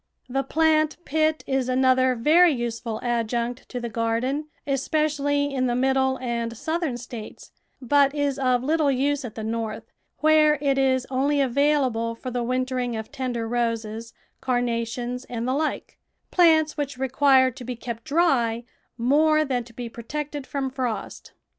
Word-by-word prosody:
The 270 +2 -1
plant 310 +2 +2
pit 315 +1 +1
is 265 -2 -1
another 255 0 +3
very 320 +9 +5
useful 235 -3 -3
adjunct 240 +1 -2
to 250 - -4
the 240 - -4
garden, 235 +6 -1 0.2
especially 285 0 0
in 255 -1 +1
the 240 - 0
IMiddle 265 +1 +1
and 235 -2 -3
Southern 315 -2 -2
States, 235 -2 -9 0.3
but 280 +2 +3
is 285 -2 -1
of 255 -2 +2
little 305 +1 +2
use 275 +2 0
at 235 -4 -7
the 220 - -5
North, 225 0 -3 0.3
where 305 -1 +4
it 275 -1 +1
is 260 -1 +2
only 280 +3 +1
available 265 -4 +1
for 255 +2 -7
the 245 0 -2
wintering 255 0 -1
of 220 0 -6
tender 245 -3 -3
roses, 230 -1 -2 0.3
carnations, 245 0 -2
and 235 0 -4
the 255 - +1
like 305 +3 -3 0.2
— - - -50
plants 320 -3 +4
wliich 285 -3 -4
require 265 0 +4
to 250 +1 -10
be 250 +1 -5
kept 235 -1 -6
dry 250 -8 +1 0.3
more 310 +5 +3
than 255 -3 -1
to 235 - -15
be 240 +1 -6
protected 285 +5 -6
from 270 -2 -3
frost. 245 -6 -4
260 Hz, 155 wpm, -24 LUFS, 235-285 Hz, 0.3 s, very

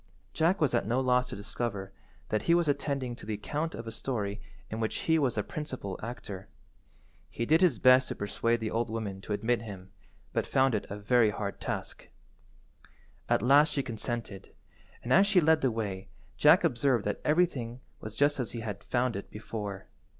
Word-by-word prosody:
Jack 170 +5 +2
was 150 -5 +2
at - - +1
no 120 +3 +1
loss 125 -1 +2
to 125 - -5
discover 100 -1 -4 0.4
that 110 -1 +1
he 170 - +3
was 170 -2 +2
attending 140 -3 -1
to - - -14
the 110 - -1
account 150 +10 -3
of 115 - -7
a 115 - -5
story 105 -4 -3 0.3
in 110 - -3
which 110 -1 -2
he 160 0 +4
was 135 -5 +1
the 105 - 0
principal 130 -11 -5
actor. 105 -5 -7 0.8
He 115 - -3
did 160 +5 +4
his 170 -11 +4
best 130 +3 +6
to - - -4
persuade 115 +3 0
the 110 - -2
old 115 0 0
woman 105 -4 -4
to 105 - -8
admit 115 +2 +1
him, 95 -4 -9 0.4
but - - 0
found 135 -1 +3
it 105 - -2
a 100 - -5
very 110 +2 +3
hard 100 -1 -4
task. - - -5 1.2
At - - +2
last 145 +4 +5
she 140 - 0
consented, 115 -4 -5 0.5
and 125 - +1
as 195 +5 +6
she 195 -3 +5
led 160 -1 +4
the 130 - +3
way 100 -4 -4 0.3
Jack - - +6
observed 120 -2 +2
that 105 - -2
everything 140 -8 +1 0.2
was 110 0 -7
just 145 +3 +2
as 125 - -3
he 115 - -4
had 105 -3 -5
found 125 -1 0
it 100 - -6
before. 105 -3 -6
120 Hz, 195 wpm, -30 LUFS, 105-135 Hz, 1.2 s, best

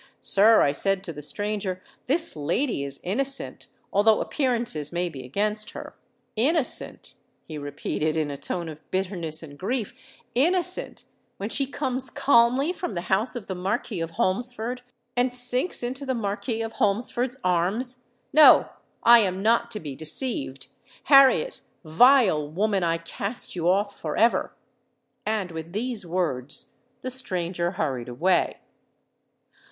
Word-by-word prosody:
—'Sir,' 215 +3 +5
I 140 - +3
said 195 +6 0
to 170 - -6
the 150 - -9
stranger, 205 +3 -3 0.3
'this 325 +5 +2
lady 155 - -1
is 140 0 -6
innocent, 270 +9 +1 0.3
although 215 +2 +4
appearances 235 - -1
may 175 0 -1
be 135 -5 -9
against 210 +10 -2
her.'—'Innocent!' 250 0 -3 0.3
he 155 -2 -7
repeated, 145 +2 -3
in 150 -2 -1
a - - -5
tone 170 +4 -4
of 155 -1 -9
bitterness 180 -4 -2
and 145 -2 -12
grief: 225 +2 -3 0.4
'_innocent 355 +7 0 0.3
when 200 +2 -4
she 275 +3 +1
comes 260 -2 -3
calmly 255 +6 +3
from 355 - -5
the 175 +2 -2
house 220 +7 +2
of 235 -5 -6
the 190 - -4
Marquis 185 +1 -3
of 165 0 -5
Holmesford, 245 +6 0 0.3
and 245 0 +1
sinks 250 +5 0
into 260 +3 -3
the 260 -2 -2
Marquis 225 +1 -3
of 225 0 -6
Holmesford's 240 +5 0
arms! 210 +9 -1 0.3
No: 305 +1 +7 0.3
I 235 0 +8
am 190 -2 -1
not 235 +1 +2
to 220 -2 -4
be 145 -4 -7
deceived! 155 - 0 0.5
Harriet, 275 - +5 0.2
vile 180 - +4
woman, 195 +3 0
I 165 -1 +1
cast 200 +8 -3
you 175 0 0
off 200 +2 0
for 155 -2 -4
ever!_'—And, 215 -3 -3
with 160 +1 -8
these 220 -3 -3
words, 170 - -1 0.3
the 255 - -5
stranger 180 -7 +1
hurried 130 -8 -3
away." 170 +10 +1
205 Hz, 140 wpm, -25 LUFS, 170-245 Hz, 0.5 s, I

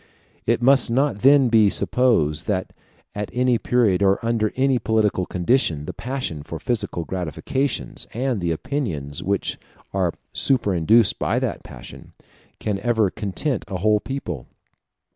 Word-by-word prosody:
It 120 +1 +1
must 135 -1 +5
not 130 -2 +1
then 135 +2 +5
be 110 -3 +5
supposed 100 - +2
that 95 -4 -2 0.4
at 105 0 -4
any 125 -1 +2
period 110 -6 +2
or 100 0 +4
under 115 -2 +1
any 130 -1 +2
political 105 -5 +1
condition, 90 - 0
the - - -6
passion 125 - -4
for 80 +3 -7
physical 85 -2 -3
gratifications, 95 - -3
and 125 -3 -2
the 85 - -1
opinions 80 - -3
which 100 +2 -2 0.3
are - - 0 0.2
superinduced 110 - +3
by - - 0
that - - -2
passion, - - -12 0.5
can 105 -2 -2
ever 110 -3 +1
content 110 +5 -3
a 95 -2 -4
whole 105 +3 +2
people. 105 - -6
110 Hz, 140 wpm, -22 LUFS, 90-125 Hz, 0.5 s, must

